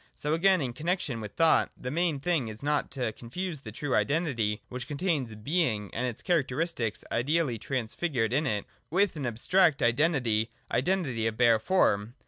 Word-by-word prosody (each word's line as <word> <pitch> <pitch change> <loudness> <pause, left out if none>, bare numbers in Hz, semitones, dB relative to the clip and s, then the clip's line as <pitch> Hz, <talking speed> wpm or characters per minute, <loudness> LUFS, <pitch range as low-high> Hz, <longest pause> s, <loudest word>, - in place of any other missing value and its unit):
So 150 +1 -1
again, 185 +2 +4
in 125 -3 -2
connexion 150 -5 -2
with 105 -1 -7
thought, 165 -1 +4
the 125 - -5
main 165 -2 0
thing 150 -4 0
is 110 +3 -8
not 150 0 0
to 125 -5 -2
confuse 160 - -5
the 110 - -8
true 135 +5 -3
Identity, 130 -9 0
which 125 0 -6
contains 145 -6 -1
Being 110 - -1
and 125 +2 -1
its 120 - -6
characteristics 155 - 0
ideally 140 -2 +1
transfigured 125 0 -1
in 150 +3 +1
it, 105 -4 -1 0.2
with 190 +1 +2
an 140 -5 -3
abstract 155 +7 +2
Identity, 120 -4 +2 0.2
identity 130 -6 0
of 110 -1 -3
bare 115 -2 +5
form. 110 - +1
135 Hz, 165 wpm, -29 LUFS, 115-165 Hz, 0.2 s, bare